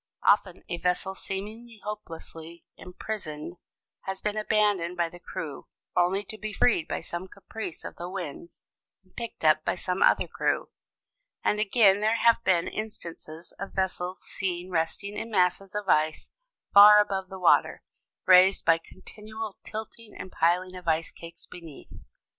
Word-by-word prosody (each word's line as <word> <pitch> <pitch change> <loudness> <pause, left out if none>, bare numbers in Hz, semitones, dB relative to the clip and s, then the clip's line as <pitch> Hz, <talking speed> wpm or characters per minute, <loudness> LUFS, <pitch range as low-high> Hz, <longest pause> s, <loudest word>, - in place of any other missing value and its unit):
Often 190 -3 +2
a 175 - -4
vessel 180 +1 0
seemingly 215 +4 -7
hopelessly 170 -5 -8
imprisoned 180 -4 -7 0.5
has 190 0 -3
been 210 +1 -2
abandoned 205 -5 +1
by 170 -1 +1
the 175 - -13
crew, 165 -6 -7 0.3
only 180 +3 +2
to 215 +2 -8
be 215 -1 -5
freed 195 -7 +2
by - - -3
some 175 +2 -6
caprice 200 -1 -8
of - - -8
the 175 +1 -6
winds 175 -3 -7 0.4
and 185 - -30
picked 235 -8 -6
up 155 0 +5
by - - 0
some 180 +1 -3
other - - +4
crew. - - -1 0.7
And 210 - +1
again 205 -1 +4
there 215 +2 +2
have 230 0 +4
been 175 -4 +2
instances 170 -6 -7
of 195 - -6
vessels 185 -1 -2
seen 180 -1 -4
resting 175 +5 -2
in 225 - -5
masses 190 -1 +1
of 210 -1 -3
ice 155 -2 +1 0.4
far 210 +1 +10
above 195 -2 0
the 190 - -7
water, 180 -2 +3 0.4
raised 185 +1 +6
by 165 0 +5
continual 215 +4 -9
tilting 220 0 -8
and 185 - -8
piling 180 +3 +1
of 180 -2 -10
ice 160 0 +1
cakes 170 0 -11
beneath. 165 -5 -12
185 Hz, 155 wpm, -27 LUFS, 170-210 Hz, 0.7 s, far